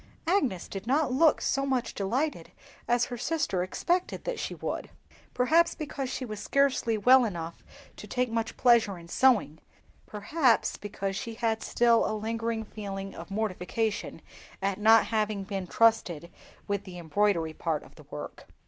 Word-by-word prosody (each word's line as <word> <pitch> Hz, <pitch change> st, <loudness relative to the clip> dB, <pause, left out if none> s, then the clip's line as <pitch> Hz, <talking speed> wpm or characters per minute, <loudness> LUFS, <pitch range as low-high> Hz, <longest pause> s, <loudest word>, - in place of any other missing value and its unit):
Agnes 285 Hz, -, +1 dB
did 195 Hz, +2 st, -7 dB
not 280 Hz, +1 st, +2 dB
look 310 Hz, +3 st, +4 dB
so 275 Hz, -, 0 dB
much 260 Hz, -3 st, -1 dB
delighted 255 Hz, +10 st, -2 dB, 0.4 s
as 240 Hz, 0 st, +3 dB
her 245 Hz, -, -7 dB
sister 285 Hz, -, 0 dB
expected 350 Hz, -, -1 dB
that -, -, -3 dB
she -, -, -4 dB
would; -, -, -4 dB, 0.5 s
perhaps 320 Hz, +7 st, +3 dB
because 280 Hz, -4 st, -4 dB
she 260 Hz, -, -4 dB
was 215 Hz, -3 st, -6 dB
scarcely 260 Hz, -1 st, +1 dB
well 255 Hz, +4 st, +6 dB
enough 170 Hz, -6 st, -5 dB, 0.3 s
to -, -, -10 dB
take 250 Hz, -2 st, -1 dB
much 225 Hz, -1 st, -2 dB
pleasure 235 Hz, -6 st, +4 dB
in 170 Hz, -1 st, -12 dB
sewing; 210 Hz, -, +3 dB, 0.5 s
perhaps 235 Hz, +5 st, +1 dB
because 195 Hz, -1 st, -4 dB
she 225 Hz, +2 st, -5 dB
had 225 Hz, -1 st, -1 dB
still 235 Hz, -1 st, +3 dB
a 215 Hz, -, -2 dB
lingering 225 Hz, +1 st, -2 dB
feeling 195 Hz, -2 st, -6 dB
of 170 Hz, -, -9 dB
mortification 210 Hz, +1 st, -2 dB, 0.4 s
at 195 Hz, 0 st, -1 dB
not 220 Hz, +1 st, +6 dB
having 215 Hz, -3 st, -1 dB
been 195 Hz, -2 st, -4 dB
trusted 175 Hz, -7 st, +2 dB, 0.4 s
with 200 Hz, -1 st, -1 dB
the 185 Hz, -3 st, -10 dB
embroidery 170 Hz, -1 st, 0 dB
part 160 Hz, -1 st, -2 dB
of -, -, -17 dB
the -, -, -17 dB
work. -, -, -8 dB
220 Hz, 155 wpm, -28 LUFS, 195-255 Hz, 0.5 s, well